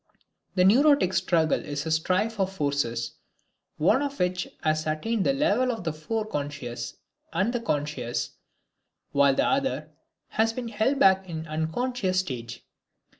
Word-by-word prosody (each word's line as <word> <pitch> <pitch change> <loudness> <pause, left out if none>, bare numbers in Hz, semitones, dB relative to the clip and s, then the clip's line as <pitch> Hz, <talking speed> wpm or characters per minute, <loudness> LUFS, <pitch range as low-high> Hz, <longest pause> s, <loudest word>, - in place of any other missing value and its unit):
The 180 -1 +4
neurotic 265 -1 +5
struggle 165 -3 +2
is 145 +1 -4
a 160 - -2
strife 185 +7 +1
of 190 0 +1
forces, 140 -9 -1 0.6
one 180 - +3
of 285 -1 -3
which 180 0 0 0.2
has 155 -1 +1
attained 195 +8 0
the - - +3
level 255 -3 +2
of 225 -6 -5
the 160 -2 -2
fore 215 +8 -3
conscious 140 - -5 0.4
and 190 +8 0
the 245 - 0
conscious, 145 - -2 0.8
while 140 -1 +4
the - - +2
other 265 - 0 0.4
has 225 +1 +1
been 240 -1 -4
held 225 +6 +1
back 190 -5 +4
in 160 -1 -4
the 160 - -13
unconscious 185 +5 0
stage. 120 -8 -7
185 Hz, 150 wpm, -26 LUFS, 150-225 Hz, 0.8 s, neurotic